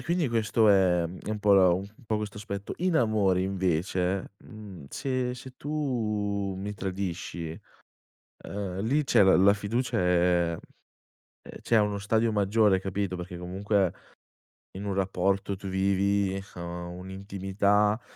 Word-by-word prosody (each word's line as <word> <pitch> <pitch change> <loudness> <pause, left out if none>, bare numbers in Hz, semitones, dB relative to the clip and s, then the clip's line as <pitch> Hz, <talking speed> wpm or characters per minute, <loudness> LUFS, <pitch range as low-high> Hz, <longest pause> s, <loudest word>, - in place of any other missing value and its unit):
e - - -8
quindi 170 -4 0
questo 110 -1 +2
è 90 -3 +4
uhm, 85 +2 -6
è - - -6
un 110 - -2
po' 105 -1 +3
la, 95 -2 +6
uhm, 90 - +2 0.2
un - - -19
po' 110 -1 -1
questo 105 -1 -5
aspetto 100 -1 -5
In 180 -2 +1
amore 100 -5 +2
invece, 95 0 -1
mhmm, 100 -9 -11
se 130 - -2
se 130 0 -10
tu 105 -9 -2
mi 105 +1 -5
tradisci, 90 -4 -4 0.9
uhm, 95 -2 -4
lì 140 +8 +1
c'è 120 -5 +4
la 95 -1 +6
la 100 +2 +6
fiducia, 110 +5 -1
ehm 90 -2 +2 0.9
ehm, - - -9
cioè 115 - +1
è - - +7
a - - +5
uno 105 -1 -1
stadio 110 +2 +1
maggiore, 105 -1 +3
capito, 95 -1 -3
perché 90 0 -7
comunque 95 +1 0 0.8
in 100 +2 -7
un 100 -1 -2
rapporto 95 +1 0
tu 95 +1 -8
vivi, 95 0 +1
uhm, 85 0 -6
un'intimità, 100 +3 0
100 Hz, 155 wpm, -28 LUFS, 95-105 Hz, 0.9 s, è